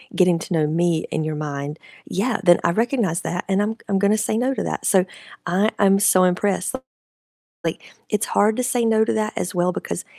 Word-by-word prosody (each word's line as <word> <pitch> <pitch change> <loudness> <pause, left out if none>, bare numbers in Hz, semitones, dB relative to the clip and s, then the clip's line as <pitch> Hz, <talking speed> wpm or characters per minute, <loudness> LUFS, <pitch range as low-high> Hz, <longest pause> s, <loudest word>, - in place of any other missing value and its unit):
getting 180 -3 +3
to 175 - -5
know 155 -2 +2
me 165 0 +1
in 155 - -1
your 155 -1 -3
mind. 145 0 -5 0.3
Yeah, 215 +4 -1
then 175 -1 +6
I 170 - +2
recognize 225 -5 0
that, 175 +1 -3
and 195 +1 +2
I'm 215 +2 -1
I'm 195 -1 +1
gonna 205 +2 +3
say 215 0 -1
no 255 +3 +1
to - - -3
that, - - -4
so 190 -2 +4 0.4
I 195 +5 +2
I'm 195 -1 +4
so 185 -2 +4
impressed, 185 +4 0 0.9
like, - - -3 0.3
it's 210 0 0
hard 210 +2 +2
to - - +1
say 250 -1 0
no 220 -1 +3
to - - -1
that 215 0 -1
as 180 - -2
well 180 0 +1
because 85 - -5
190 Hz, 210 wpm, -21 LUFS, 175-215 Hz, 0.9 s, then